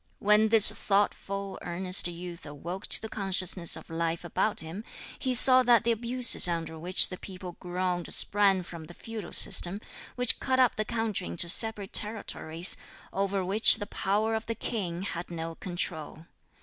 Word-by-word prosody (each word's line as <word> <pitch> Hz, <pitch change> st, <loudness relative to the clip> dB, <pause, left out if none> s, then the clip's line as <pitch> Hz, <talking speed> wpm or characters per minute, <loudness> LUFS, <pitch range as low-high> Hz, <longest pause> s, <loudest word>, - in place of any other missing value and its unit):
When 210 Hz, +1 st, +1 dB
this 220 Hz, -1 st, +8 dB
thoughtful, 200 Hz, -1 st, -4 dB
earnest 180 Hz, +1 st, +1 dB
youth 175 Hz, 0 st, -11 dB
awoke 170 Hz, +7 st, -9 dB
to -, -, -3 dB
the 220 Hz, -, -9 dB
consciousness 190 Hz, -4 st, -1 dB
of -, -, -12 dB
life 165 Hz, +1 st, -5 dB
about 205 Hz, +5 st, -4 dB
him, 165 Hz, +6 st, -10 dB, 0.4 s
he 255 Hz, -1 st, -3 dB
saw 255 Hz, +1 st, +9 dB
that 240 Hz, -2 st, +1 dB
the 235 Hz, -, -1 dB
abuses 235 Hz, -1 st, +3 dB
under 165 Hz, -2 st, -6 dB
which 180 Hz, +3 st, +1 dB
the 185 Hz, -, -11 dB
people 185 Hz, -2 st, -11 dB
groaned 180 Hz, -1 st, -6 dB
sprang 195 Hz, -2 st, 0 dB
from 170 Hz, -2 st, -13 dB
the 175 Hz, -, -16 dB
feudal 225 Hz, -2 st, -11 dB
system, 195 Hz, 0 st, +6 dB, 0.4 s
which 250 Hz, -1 st, +2 dB
cut 260 Hz, -1 st, -3 dB
up 255 Hz, -2 st, +1 dB
the 215 Hz, -, -5 dB
country 225 Hz, -, -4 dB
into 85 Hz, -, -5 dB
separate 205 Hz, +2 st, +2 dB
territories, 185 Hz, -5 st, +1 dB, 0.4 s
over 195 Hz, -1 st, -4 dB
which 205 Hz, +4 st, +5 dB
the 205 Hz, -, -7 dB
power 210 Hz, +2 st, -4 dB
of 220 Hz, 0 st, -6 dB
the 230 Hz, -, -5 dB
king 185 Hz, -6 st, -6 dB
had 175 Hz, -3 st, -7 dB
no 165 Hz, -1 st, -8 dB
control. 165 Hz, -3 st, -8 dB
195 Hz, 165 wpm, -25 LUFS, 175-220 Hz, 0.4 s, saw